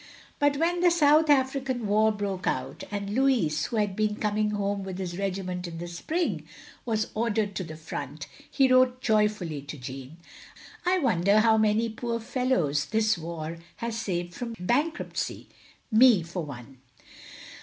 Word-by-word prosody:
But 290 -1 +3
when 340 +3 +1
the 355 0 +5
South 310 -2 +4
African 265 -3 +1
War 215 +2 +3
broke 200 -3 -3
out, - - -2
and 200 -1 -4
Louis, 230 - +2
who - - -4
had 205 -3 0
been 215 0 0
coming 210 0 0
home 200 -1 -1
with 190 -1 -6
his 180 -2 -4
regiment 185 -2 -3
in 165 -1 -7
the 175 +1 -5
spring, 315 - -2 0.4
was 220 -2 -1
ordered 215 -2 0
to 185 - -2
the 160 -2 -8
front, 145 -2 -6 0.2
he 270 -2 +3
wrote 255 0 +4
joyftilly 210 - 0
to 150 - -6
Jeanne: 135 +3 -8 0.4
/ - - -17
/ 365 +1 0
wonder 200 -2 +4
how 220 0 +5
many 220 +1 +2
poor 230 +1 -3
fellows 220 - 0
this 220 0 +2
war 165 -1 -6 0.2
has 235 -1 -4
saved 175 -6 -3
from 235 +1 -5
bankruptcy. 280 - -2 0.4
Me, 220 -4 +6
for 170 +1 -5
one. 135 -2 -10
210 Hz, 160 wpm, -27 LUFS, 175-240 Hz, 0.4 s, Me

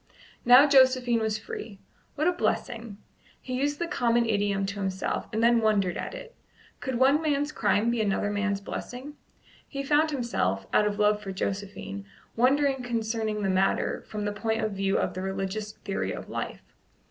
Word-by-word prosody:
Now 250 +4 +9
Josephine 260 -3 +5
was 220 -1 0
free. 215 -1 -8 0.4
"What 305 +2 +1
a - - +5
blessing!" 235 - -2 0.4
He 255 - -7
used 290 +1 0
the 345 - -1
common 240 -8 +1
idiom 205 -2 0
to 200 +1 -5
himself, 190 -1 -2
and 225 0 0
then 235 0 +5
wondered 205 -5 +2
at - - -5
it. 485 -1 -10 0.5
Could 260 -2 -3
one 270 +4 +4
man's 290 -1 0
crime 215 0 +1
be 235 -2 0
another 205 0 0
man's 205 -1 -1
blessing? 250 +7 -6 0.5
He 275 0 -4
found 300 +3 +3
himself, 225 - -1
out 210 - +4
of 205 0 -2
love 210 0 +3
for 195 -2 -5
Josephine, 200 +1 -4 0.3
wondering 270 +2 +3
concerning 220 -3 -2
the 195 - +1
matter 190 +1 +1
from 210 -1 -4
the 205 - -1
point 220 +1 -1
of 215 - 0
view 195 0 0
of - - -1
the 185 - -5
religious 195 +2 -3
theory 195 - -3
of - - -8
life. - - -5
220 Hz, 175 wpm, -27 LUFS, 200-260 Hz, 0.5 s, Now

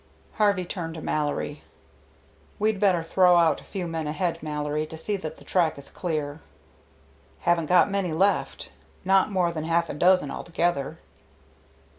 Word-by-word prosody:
Harvey 200 -4 +3
turned 170 -2 -5
to - - -6
Mallory. 150 -1 -2 1.0
"We'd 215 -1 +1
better 185 -5 +3
throw 180 +1 +4
out 165 -2 +3
a - - -17
few 190 -3 -5
men 165 -2 -3
ahead, 165 +3 -2
Mallory, 150 0 -2
to 160 - -8
see 205 +6 -2
that 160 -4 -7
the - - -15
track 170 -5 +1
is 140 - -10
clear." 155 -4 -3 1.0
"Haven't 170 -2 +1
got 180 +3 +5
many 195 -3 -1
left, 195 +6 0 0.3
not 190 +1 +4
more 180 -3 +1
than 160 -2 -4
half 170 0 +1
a - - -5
dozen 180 -1 +3
altogether." 170 -5 -2
170 Hz, 155 wpm, -26 LUFS, 155-185 Hz, 1.0 s, got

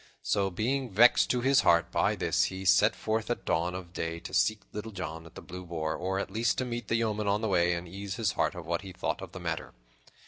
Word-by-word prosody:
So, 100 -1 +1
being 125 +7 -1
vexed 115 +5 +5
to 125 - +1
his 135 +2 +4
heart 85 0 +3
by - - +2
this, - - +1
he 95 +1 -5
set 105 +4 +5
forth 110 0 -2
at - - -2
dawn 85 +3 0
of 90 -2 -8
day 85 -1 -3
to - - -9
seek 110 -1 +2
Little 105 +1 -5
John 80 -4 -6
at - - -17
the - - -9
Blue 90 +1 -8
Boar, 80 -3 -3
or 95 +2 -2
at 100 - -3
least 115 +3 +1
to 130 - 0
meet 120 -3 -4
the 115 - +1
yeoman 110 -2 0
on 100 +1 +1
the 110 - 0
way, 90 -3 +3
and 85 +1 -6
ease 95 +2 -6
his 105 -4 0
heart - - 0
of 90 -3 -7
what 85 +2 -1
he 95 -1 -9
thought - - -3
of - - -8
the - - -8
matter. - - -4
95 Hz, 255 wpm, -29 LUFS, 85-110 Hz, -, vexed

